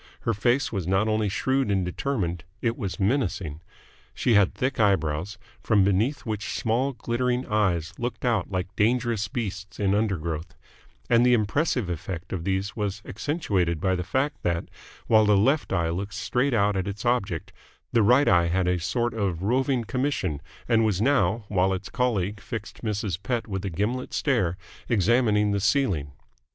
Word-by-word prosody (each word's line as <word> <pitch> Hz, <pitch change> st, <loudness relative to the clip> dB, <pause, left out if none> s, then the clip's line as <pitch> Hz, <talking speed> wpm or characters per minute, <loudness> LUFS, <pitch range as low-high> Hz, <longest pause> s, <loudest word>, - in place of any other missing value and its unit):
Her 115 Hz, -, 0 dB
face 120 Hz, +6 st, +1 dB
was 95 Hz, -6 st, -3 dB
not 95 Hz, +3 st, +2 dB
only 110 Hz, -1 st, +1 dB
shrewd 130 Hz, +5 st, 0 dB
and 95 Hz, -2 st, +1 dB
determined: 90 Hz, -, -2 dB, 0.2 s
it 115 Hz, +1 st, 0 dB
was 100 Hz, -3 st, -4 dB
menacing. 95 Hz, -, -1 dB, 0.5 s
She 120 Hz, -, +2 dB
had 100 Hz, -3 st, +4 dB
thick 130 Hz, 0 st, -1 dB
eyebrows, 95 Hz, -3 st, +1 dB, 0.2 s
from 105 Hz, -3 st, +3 dB
beneath 105 Hz, +9 st, +1 dB
which 105 Hz, -3 st, -3 dB
small, 125 Hz, +5 st, 0 dB
glittering 125 Hz, +1 st, -1 dB
eyes 95 Hz, -7 st, 0 dB
looked 120 Hz, +1 st, -3 dB
out 115 Hz, -7 st, +1 dB
like 95 Hz, 0 st, -3 dB
dangerous 115 Hz, -2 st, +1 dB
beasts 100 Hz, -2 st, -5 dB
in 100 Hz, -1 st, +2 dB
undergrowth: 85 Hz, -6 st, -2 dB, 0.5 s
and 120 Hz, 0 st, +4 dB
the 125 Hz, 0 st, +5 dB
impressive 120 Hz, -, 0 dB
effect 85 Hz, +1 st, -5 dB
of 85 Hz, -3 st, -4 dB
these 95 Hz, +1 st, -1 dB
was 105 Hz, -1 st, -3 dB
accentuated 100 Hz, -, -1 dB
by 95 Hz, +3 st, +1 dB
the 90 Hz, -, -1 dB
fact 135 Hz, +10 st, -1 dB
that, 85 Hz, -1 st, -1 dB, 0.4 s
while 110 Hz, -2 st, +5 dB
the 105 Hz, -1 st, +5 dB
left 135 Hz, +9 st, +2 dB
eye 85 Hz, -3 st, +1 dB
looked 95 Hz, +3 st, -4 dB
straight 125 Hz, +5 st, 0 dB
out 100 Hz, -1 st, +2 dB
at 95 Hz, 0 st, -1 dB
its 100 Hz, +3 st, -5 dB
object, 120 Hz, -4 st, -1 dB, 0.4 s
the 115 Hz, -, +5 dB
right 125 Hz, +7 st, +5 dB
eye 85 Hz, -2 st, +4 dB
had 90 Hz, +1 st, +1 dB
a 90 Hz, 0 st, +1 dB
sort 120 Hz, +7 st, -1 dB
of 95 Hz, -6 st, -2 dB
roving 125 Hz, +3 st, +1 dB
commission 125 Hz, -, -1 dB, 0.3 s
and 115 Hz, -1 st, +3 dB
was 105 Hz, -4 st, +1 dB
now, 115 Hz, -4 st, +2 dB
while 95 Hz, -1 st, +2 dB
its 95 Hz, +1 st, -5 dB
colleague 105 Hz, -6 st, 0 dB
fixed -, -, -7 dB
Mrs. 105 Hz, -5 st, -2 dB
Pett 120 Hz, +3 st, -2 dB
with 95 Hz, -2 st, -4 dB
a -, -, -1 dB
gimlet 105 Hz, +9 st, -2 dB
stare, 95 Hz, -, +1 dB, 0.3 s
examining 105 Hz, -1 st, +3 dB
the 100 Hz, -, +1 dB
ceiling. 100 Hz, -, +1 dB
105 Hz, 170 wpm, -26 LUFS, 95-120 Hz, 0.5 s, the